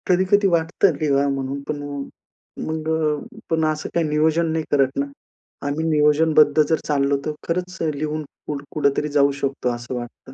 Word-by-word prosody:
कधी-कधी 190 Hz, +2 st, +3 dB
वाटतं 170 Hz, +1 st, +2 dB
लिहाव 140 Hz, -2 st, +2 dB
म्हणून. 135 Hz, 0 st, -3 dB
पण 145 Hz, -1 st, -3 dB
अ, 145 Hz, 0 st, -5 dB, 0.7 s
मग 160 Hz, 0 st, -3 dB
अ, 160 Hz, +8 st, -1 dB
पण 160 Hz, -1 st, +2 dB
असं 155 Hz, 0 st, -4 dB
काही 170 Hz, -2 st, +2 dB
नियोजन 160 Hz, +2 st, +2 dB
नाही 160 Hz, 0 st, -1 dB
करत 135 Hz, -2 st, +2 dB
ना, 140 Hz, -, +1 dB, 0.6 s
आम्ही 145 Hz, +3 st, -1 dB
नियोजनबद्ध 150 Hz, 0 st, +4 dB
जर 160 Hz, +2 st, +2 dB
चाललो 140 Hz, -1 st, +2 dB
तर 155 Hz, -, 0 dB, 0.2 s
खरंच 180 Hz, +2 st, -2 dB
अ, 165 Hz, -, +1 dB
लिहून 155 Hz, +1 st, -2 dB, 0.2 s
कुठ 145 Hz, -1 st, -4 dB
कुठेतरी 150 Hz, 0 st, +1 dB
जाऊ 140 Hz, 0 st, +5 dB
शकतो 135 Hz, -2 st, -1 dB
असं 120 Hz, +2 st, -6 dB
वाटतं. 120 Hz, +2 st, -8 dB
150 Hz, 170 wpm, -22 LUFS, 140-160 Hz, 0.7 s, जाऊ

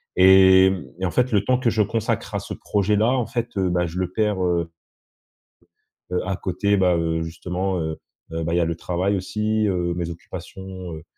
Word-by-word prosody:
Et 95 Hz, 0 st, +7 dB
mmh 95 Hz, -2 st, -5 dB, 0.2 s
et -, -, +1 dB
en 90 Hz, -, -1 dB
fait, 125 Hz, +4 st, +1 dB
le 100 Hz, -2 st, +2 dB
temps 125 Hz, 0 st, +2 dB
que 125 Hz, -, +2 dB
je 110 Hz, -1 st, +1 dB
consacre 110 Hz, +2 st, -2 dB
à -, -, +1 dB
ce -, -, -7 dB
projet 105 Hz, 0 st, 0 dB
là, 110 Hz, +4 st, +3 dB
en 125 Hz, -3 st, 0 dB
fait, 120 Hz, -2 st, -2 dB
heu, 95 Hz, -1 st, +1 dB
bah, 90 Hz, 0 st, +1 dB
je 85 Hz, +2 st, -5 dB
le 90 Hz, -1 st, -2 dB
perds, 105 Hz, -2 st, 0 dB
heu 85 Hz, -2 st, 0 dB, 1.4 s
heu, 90 Hz, -, +1 dB
à 95 Hz, +1 st, -1 dB
côté, 100 Hz, +2 st, 0 dB
bah, 90 Hz, -2 st, +3 dB
heu, 80 Hz, 0 st, -1 dB
justement, 90 Hz, +3 st, -3 dB
heu 80 Hz, -1 st, -3 dB, 0.3 s
heu, 80 Hz, 0 st, -3 dB
bah, 85 Hz, +1 st, -2 dB
il -, -, +2 dB
y -, -, +3 dB
a 85 Hz, -, +2 dB
le 85 Hz, -, -2 dB
travail 90 Hz, +4 st, -1 dB
aussi, 105 Hz, +3 st, -1 dB
heu, 90 Hz, -2 st, 0 dB
mes 85 Hz, -1 st, -3 dB
occupations, 95 Hz, +1 st, -8 dB
heu 80 Hz, -1 st, -9 dB
95 Hz, 220 wpm, -23 LUFS, 85-100 Hz, 1.4 s, Et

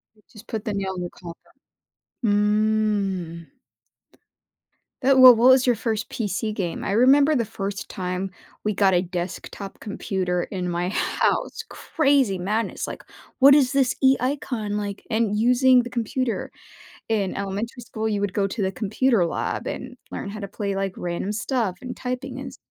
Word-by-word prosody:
W 215 Hz, -, -27 dB
just 215 Hz, +1 st, -14 dB
put 220 Hz, -1 st, -4 dB
the 215 Hz, -, -3 dB
nail 195 Hz, -1 st, -2 dB
in 180 Hz, -1 st, -4 dB
collar. 170 Hz, -1 st, -13 dB, 0.7 s
Mm. 205 Hz, -5 st, +1 dB, 1.6 s
Th 275 Hz, -, +5 dB
well 255 Hz, -2 st, +10 dB
what 240 Hz, +3 st, +5 dB
was 260 Hz, -1 st, +5 dB
your 245 Hz, -, +4 dB
1st 220 Hz, -1 st, -2 dB
PC 215 Hz, 0 st, -2 dB
game? 175 Hz, -5 st, -3 dB
I -, -, -3 dB
remember 280 Hz, +7 st, +5 dB
the 235 Hz, -, +1 dB
1st 200 Hz, -2 st, -5 dB
time 185 Hz, +1 st, -4 dB, 0.3 s
we 210 Hz, -, 0 dB
got 195 Hz, -2 st, +3 dB
a 175 Hz, -, +3 dB
desktop 180 Hz, +2 st, -6 dB
computer 185 Hz, -4 st, -2 dB
in 180 Hz, -2 st, -4 dB
my 175 Hz, +1 st, -1 dB
house, 205 Hz, -, 0 dB
crazy 275 Hz, -, +1 dB
madness, 210 Hz, +5 st, -2 dB
like, -, -, -7 dB, 0.3 s
"What 275 Hz, +1 st, +8 dB
is 275 Hz, -4 st, +4 dB
this 270 Hz, -3 st, +2 dB
e 265 Hz, 0 st, +5 dB
icon," 250 Hz, -6 st, -2 dB
like 205 Hz, -1 st, -4 dB
and 220 Hz, -2 st, +1 dB
using 250 Hz, +2 st, +5 dB
the 245 Hz, -, -8 dB
computer. 240 Hz, +1 st, -2 dB, 0.6 s
In 205 Hz, -4 st, 0 dB
elementary 205 Hz, +5 st, -4 dB
school, 220 Hz, -1 st, -3 dB
you 205 Hz, -2 st, -1 dB
would 200 Hz, -, -1 dB
go 200 Hz, -1 st, +1 dB
to 210 Hz, -, -5 dB
the 190 Hz, 0 st, 0 dB
computer 220 Hz, 0 st, +1 dB
lab 170 Hz, -, -3 dB
and -, -, -6 dB
learn 200 Hz, -, -5 dB
how 215 Hz, +1 st, -7 dB
to 200 Hz, -, -5 dB
play, 200 Hz, 0 st, -3 dB
like, 195 Hz, -1 st, -2 dB
random 175 Hz, +3 st, -3 dB
stuff 215 Hz, -2 st, -1 dB
and 250 Hz, -1 st, -7 dB
typing 255 Hz, +1 st, -5 dB
and 275 Hz, -, -6 dB
s -, -, -12 dB
210 Hz, 170 wpm, -24 LUFS, 195-245 Hz, 1.6 s, well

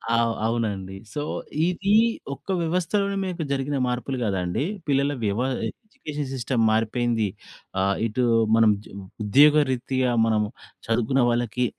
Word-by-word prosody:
అవ్ 115 Hz, 0 st, +2 dB
అవునండి. 105 Hz, -5 st, -2 dB, 0.2 s
సో, 145 Hz, -, -2 dB, 0.5 s
ఇది 195 Hz, +3 st, 0 dB, 0.4 s
ఒక్క -, -, -13 dB
వ్యవస్థలోనే 185 Hz, +4 st, 0 dB
మీకు 180 Hz, -3 st, -3 dB
జరిగిన 140 Hz, +1 st, -1 dB
మార్పులు 125 Hz, +2 st, -2 dB
కాదండి. 95 Hz, +1 st, -1 dB, 0.2 s
పిల్లల 140 Hz, 0 st, +2 dB
వ్యవ 105 Hz, +1 st, 0 dB, 0.3 s
ఎడ్యుకేషన్ 150 Hz, -, -7 dB
సిస్టమ్ 125 Hz, -2 st, 0 dB
మారిపోయింది. 115 Hz, 0 st, +1 dB, 0.5 s
ఆహ్, 100 Hz, +1 st, +2 dB
ఇటు 120 Hz, +3 st, -1 dB, 0.3 s
మనం 115 Hz, -1 st, +5 dB
జ్ -, -, -14 dB, 0.3 s
ఉద్యోగరీతగా 130 Hz, 0 st, +3 dB
మనం 110 Hz, -1 st, +2 dB, 0.5 s
చదువుకున్న 120 Hz, +4 st, +2 dB
వాళ్ళకి 120 Hz, +1 st, 0 dB
125 Hz, 115 wpm, -24 LUFS, 115-145 Hz, 0.5 s, మనం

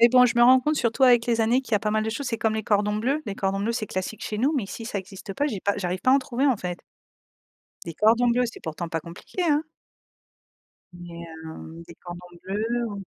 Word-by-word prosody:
Mais 235 Hz, -, +8 dB
bon, 250 Hz, +1 st, +6 dB
je 240 Hz, -, -1 dB
me 240 Hz, -, +6 dB
rends 255 Hz, +1 st, +7 dB
compte 305 Hz, +4 st, +1 dB
surtout 235 Hz, +2 st, +2 dB
avec 240 Hz, -2 st, +6 dB
les 230 Hz, -1 st, +1 dB
années 240 Hz, +4 st, +3 dB
qu'il 245 Hz, -, -13 dB
y 210 Hz, -, +6 dB
a -, -, 0 dB
pas 210 Hz, 0 st, -1 dB
mal 215 Hz, 0 st, +1 dB
de 220 Hz, -, -1 dB
choses, 270 Hz, +4 st, -4 dB
c'est 230 Hz, -, -1 dB
comme 220 Hz, -1 st, +1 dB
les 220 Hz, -, -2 dB
cordons 210 Hz, 0 st, +1 dB
bleus, 275 Hz, +8 st, 0 dB
les 200 Hz, -, -3 dB
cordons 195 Hz, 0 st, -1 dB
bleus 225 Hz, +3 st, 0 dB
c'est 225 Hz, -2 st, -3 dB
classique 185 Hz, +3 st, -4 dB
chez 210 Hz, -, -3 dB
nous, 270 Hz, +6 st, +2 dB
mais 235 Hz, -, 0 dB
ici 225 Hz, +3 st, -7 dB
ça 210 Hz, -3 st, -3 dB
existe 195 Hz, +1 st, -8 dB
pas, 290 Hz, -, 0 dB
j'ai 210 Hz, -10 st, -3 dB
pas 200 Hz, -, +1 dB
j'arrive 180 Hz, -1 st, -2 dB
pas 255 Hz, -, +3 dB
à -, -, +7 dB
en 275 Hz, -, +5 dB
trouver, 260 Hz, +1 st, -1 dB
en 255 Hz, -5 st, +3 dB
fait 180 Hz, -2 st, -4 dB, 1.1 s
des 165 Hz, -, -6 dB
cordons 230 Hz, +6 st, +4 dB
bleus, 245 Hz, +1 st, +2 dB
c'est -, -, -13 dB
pourtant 165 Hz, +2 st, -5 dB
pas 165 Hz, 0 st, -2 dB
compliqué, 170 Hz, -, -6 dB
hein 305 Hz, -2 st, +2 dB, 1.3 s
mais, 170 Hz, -1 st, -9 dB, 0.2 s
heu, 160 Hz, +1 st, -9 dB
des 170 Hz, -, -12 dB
cordons 175 Hz, 0 st, -10 dB, 0.2 s
bleus? 225 Hz, +5 st, -1 dB
Ou 200 Hz, -1 st, -6 dB
220 Hz, 260 wpm, -25 LUFS, 190-245 Hz, 1.3 s, Mais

